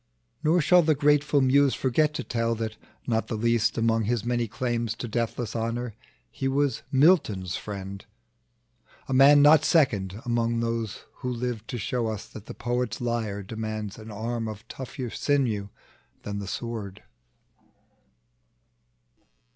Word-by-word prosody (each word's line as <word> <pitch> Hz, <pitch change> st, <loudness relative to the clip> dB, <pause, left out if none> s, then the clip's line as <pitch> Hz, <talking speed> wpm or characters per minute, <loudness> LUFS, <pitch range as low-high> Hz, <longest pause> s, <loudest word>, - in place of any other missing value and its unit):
Nor 165 Hz, +3 st, +4 dB
shall 180 Hz, +3 st, +6 dB
the 155 Hz, -2 st, +2 dB
grateful 145 Hz, 0 st, +3 dB
Muse 135 Hz, +1 st, +4 dB
forget 150 Hz, +4 st, +2 dB
to -, -, -3 dB
tell, 115 Hz, 0 st, -1 dB
That 110 Hz, -1 st, -4 dB, 0.3 s
not 115 Hz, -2 st, 0 dB
the 115 Hz, -, -3 dB
least 115 Hz, 0 st, +1 dB
among 115 Hz, -1 st, +2 dB
his 115 Hz, 0 st, -1 dB
many 120 Hz, -1 st, 0 dB
claims 115 Hz, 0 st, -2 dB
To 120 Hz, -, -5 dB
deathless 120 Hz, +1 st, -2 dB
honor 115 Hz, +1 st, -2 dB, 0.4 s
he 135 Hz, -, -3 dB
was 140 Hz, -2 st, +1 dB
Milton's 130 Hz, -, +3 dB
friend, 100 Hz, -1 st, -6 dB, 1.0 s
A 135 Hz, -, -2 dB
man 140 Hz, +2 st, +7 dB
not 150 Hz, +1 st, +7 dB
second 105 Hz, -, +2 dB
among 115 Hz, -1 st, 0 dB
those 115 Hz, -2 st, -2 dB
who 125 Hz, -, -4 dB
lived 120 Hz, -2 st, -3 dB
To 125 Hz, -, -4 dB
show 115 Hz, +2 st, -1 dB
us 110 Hz, -2 st, -4 dB
that 110 Hz, 0 st, -11 dB
the -, -, -8 dB
poet's 120 Hz, -2 st, -2 dB
lyre 115 Hz, -4 st, -2 dB
demands 110 Hz, 0 st, -5 dB
An 110 Hz, +1 st, -10 dB
arm 115 Hz, +2 st, -3 dB
of 105 Hz, -1 st, -8 dB
tougher 130 Hz, -2 st, -6 dB
sinew 120 Hz, -9 st, 0 dB, 0.5 s
than 100 Hz, 0 st, -4 dB
the 100 Hz, -, -6 dB
sword. 105 Hz, -3 st, -5 dB
115 Hz, 145 wpm, -26 LUFS, 110-130 Hz, 1.0 s, man